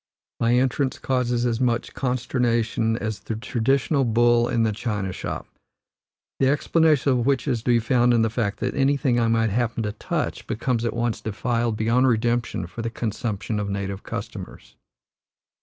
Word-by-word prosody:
My 115 Hz, +1 st, +3 dB
entrance 130 Hz, +1 st, +1 dB
causes 125 Hz, -2 st, 0 dB
as 120 Hz, 0 st, 0 dB
much 120 Hz, -2 st, 0 dB
consternation 120 Hz, -3 st, 0 dB
as 110 Hz, -3 st, -3 dB
the 110 Hz, -, -5 dB
traditional 135 Hz, +5 st, +1 dB
bull 120 Hz, 0 st, +3 dB
in 115 Hz, -, +1 dB
the 110 Hz, -, +2 dB
china 105 Hz, -3 st, -3 dB
shop, -, -, -5 dB, 0.9 s
the 135 Hz, -, +3 dB
explanation 150 Hz, 0 st, +3 dB
of 125 Hz, -2 st, +1 dB
which 140 Hz, +1 st, +1 dB
is 125 Hz, -4 st, +1 dB
to -, -, -26 dB
be 120 Hz, -, +5 dB
found 120 Hz, +1 st, +3 dB
in 115 Hz, -1 st, +3 dB
the 115 Hz, -, 0 dB
fact 105 Hz, -3 st, -2 dB
that 125 Hz, -, -1 dB
anything 135 Hz, -2 st, +2 dB
I 115 Hz, -, +2 dB
might 115 Hz, -1 st, +2 dB
happen 115 Hz, +1 st, 0 dB
to 105 Hz, -, -2 dB
touch 105 Hz, -, -3 dB
becomes 115 Hz, +1 st, -1 dB
at 115 Hz, -, -2 dB
once 120 Hz, -1 st, -1 dB
defiled 115 Hz, +1 st, -1 dB
beyond 115 Hz, +4 st, +3 dB
redemption 120 Hz, -4 st, 0 dB
for 95 Hz, +7 st, -7 dB
the 115 Hz, -, -2 dB
consumption 110 Hz, -1 st, -3 dB
of 100 Hz, -1 st, -3 dB
native 100 Hz, -1 st, -3 dB
customers. -, -, -8 dB
120 Hz, 170 wpm, -24 LUFS, 110-125 Hz, 0.9 s, be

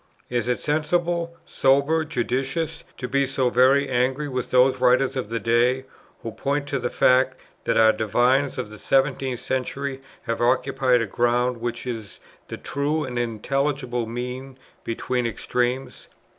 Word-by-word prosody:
Is 120 Hz, -1 st, 0 dB
it 125 Hz, -, 0 dB
sensible, 170 Hz, +3 st, 0 dB
sober, 140 Hz, +4 st, +2 dB
judicious, 135 Hz, +3 st, -2 dB
to 125 Hz, -, -4 dB
be 140 Hz, +1 st, +1 dB
so 130 Hz, -2 st, 0 dB
very 135 Hz, +3 st, +4 dB
angry 130 Hz, +3 st, 0 dB
with 130 Hz, -3 st, -3 dB
those 130 Hz, 0 st, +4 dB
writers 130 Hz, +2 st, +3 dB
of 125 Hz, -5 st, -3 dB
the 115 Hz, 0 st, -2 dB
day, 120 Hz, +3 st, +2 dB, 0.4 s
who 115 Hz, -, -4 dB
point 140 Hz, +4 st, -2 dB
to 140 Hz, -, -1 dB
the 120 Hz, 0 st, -2 dB
fact, 130 Hz, +1 st, +3 dB, 0.3 s
that -, -, +1 dB
our 110 Hz, -1 st, +6 dB
divines 125 Hz, +6 st, +1 dB
of 125 Hz, -5 st, -4 dB
the 110 Hz, -, -11 dB
seventeenth 135 Hz, -2 st, +1 dB
century 135 Hz, +1 st, -3 dB, 0.2 s
have 115 Hz, -, -3 dB
occupied 130 Hz, 0 st, +2 dB
a -, -, -1 dB
ground 120 Hz, +3 st, +1 dB
which 120 Hz, +1 st, -4 dB
is 110 Hz, -6 st, -6 dB, 0.3 s
the -, -, -6 dB
true 150 Hz, +3 st, -1 dB
and 125 Hz, -3 st, -3 dB
intelligible 125 Hz, +1 st, -1 dB
mean 125 Hz, +3 st, -6 dB, 0.3 s
between 120 Hz, +1 st, -1 dB
extremes? 125 Hz, +3 st, -2 dB
130 Hz, 150 wpm, -24 LUFS, 120-135 Hz, 0.4 s, our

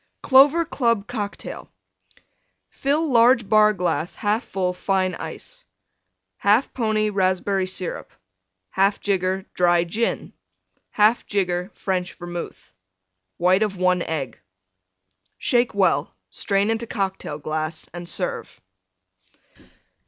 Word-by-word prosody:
CLOVER 285 Hz, +5 st, +6 dB
CLUB 235 Hz, -9 st, 0 dB
COCKTAIL 215 Hz, -4 st, -6 dB, 1.0 s
Fill 295 Hz, +2 st, 0 dB
large 235 Hz, -1 st, +5 dB
Bar 215 Hz, 0 st, +5 dB
glass 175 Hz, -2 st, -2 dB
1/2 215 Hz, +2 st, 0 dB
full 185 Hz, -6 st, -2 dB
Fine 185 Hz, 0 st, 0 dB
Ice. -, -, -8 dB, 0.8 s
1/2 210 Hz, +6 st, +3 dB
pony 215 Hz, -3 st, 0 dB
Raspberry 190 Hz, 0 st, 0 dB
Syrup. 185 Hz, -1 st, -5 dB, 0.6 s
1/2 195 Hz, +1 st, +2 dB
jigger 190 Hz, -1 st, -1 dB
Dry 175 Hz, -1 st, +3 dB
Gin. 215 Hz, +7 st, -2 dB, 0.6 s
1/2 215 Hz, +3 st, +3 dB
jigger 180 Hz, -2 st, -1 dB
French 185 Hz, -2 st, -2 dB
Vermouth. 175 Hz, -, -8 dB, 0.6 s
White 185 Hz, +3 st, +3 dB
of 210 Hz, -3 st, 0 dB
1 180 Hz, 0 st, +2 dB
Egg. 160 Hz, -5 st, -4 dB, 1.0 s
Shake 240 Hz, -3 st, +1 dB
well; 175 Hz, -6 st, +1 dB, 0.2 s
strain 200 Hz, +1 st, 0 dB
into 225 Hz, +1 st, -2 dB
Cocktail 190 Hz, -8 st, -3 dB
glass 155 Hz, +1 st, -4 dB
and 175 Hz, 0 st, -6 dB
serve. -, -, -3 dB
195 Hz, 105 wpm, -23 LUFS, 180-220 Hz, 1.0 s, CLOVER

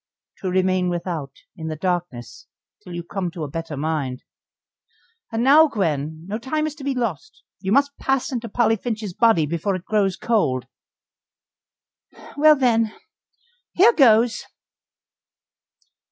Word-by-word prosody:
"To 190 Hz, -, -3 dB
remain 185 Hz, 0 st, +1 dB
without 170 Hz, -5 st, -3 dB, 0.3 s
in 160 Hz, -4 st, -7 dB
the 155 Hz, -, -3 dB
darkness 175 Hz, -8 st, -4 dB, 0.3 s
till 175 Hz, -, -9 dB
you 175 Hz, -, -5 dB
come 180 Hz, +1 st, -3 dB
to 170 Hz, -2 st, -7 dB
a -, -, -3 dB
better 160 Hz, 0 st, -6 dB
mind. 145 Hz, -4 st, -3 dB, 1.1 s
And 225 Hz, +1 st, -1 dB
now, 300 Hz, +5 st, +7 dB
Gwen, 160 Hz, -, -2 dB
no 210 Hz, +4 st, -4 dB
time 305 Hz, +6 st, -2 dB
is 310 Hz, -, -3 dB
to 285 Hz, -, -10 dB
be 275 Hz, -1 st, -1 dB
lost; 230 Hz, -, -4 dB, 0.2 s
you 190 Hz, +1 st, -3 dB
must 280 Hz, +4 st, +3 dB
pass 270 Hz, -1 st, 0 dB
into 235 Hz, -2 st, -4 dB
Polly 225 Hz, 0 st, +2 dB
Finch's 215 Hz, -3 st, -4 dB
body 225 Hz, -7 st, +3 dB
before 170 Hz, +5 st, -2 dB
it 185 Hz, -, -7 dB
grows 200 Hz, -4 st, +1 dB
cold." 135 Hz, -, 0 dB, 1.7 s
"Well, 305 Hz, +1 st, +6 dB
then 230 Hz, -5 st, +2 dB, 0.8 s
here 425 Hz, +7 st, +6 dB
goes!" 235 Hz, -, +4 dB
195 Hz, 140 wpm, -22 LUFS, 165-240 Hz, 1.7 s, now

